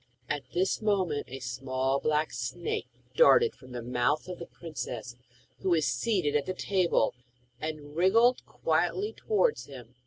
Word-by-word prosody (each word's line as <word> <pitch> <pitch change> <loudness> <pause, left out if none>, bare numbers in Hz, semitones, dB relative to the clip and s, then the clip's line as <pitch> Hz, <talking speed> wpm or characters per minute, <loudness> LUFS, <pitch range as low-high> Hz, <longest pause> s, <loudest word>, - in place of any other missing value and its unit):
At 145 - -1
this 185 +4 0
moment 190 -8 +1
a 130 - -6
small 130 +1 -1
black 155 +1 +1
snake 125 +8 -3 0.3
darted 475 -2 +6
from 130 -1 -15
the 120 -1 -5
mouth 125 +6 0
of 180 -1 -6
the 170 - -7
princess, 125 -7 -6 0.4
who 190 - -1
was 165 -4 +3
seated 150 - +1
at 145 -1 +1
the 185 - -2
table, 185 - +2 0.5
and 150 -1 -6
wriggled 225 +8 +4
quickly 420 +3 0
towards 450 +2 +1
him. 125 -3 -11
155 Hz, 150 wpm, -29 LUFS, 130-185 Hz, 0.5 s, darted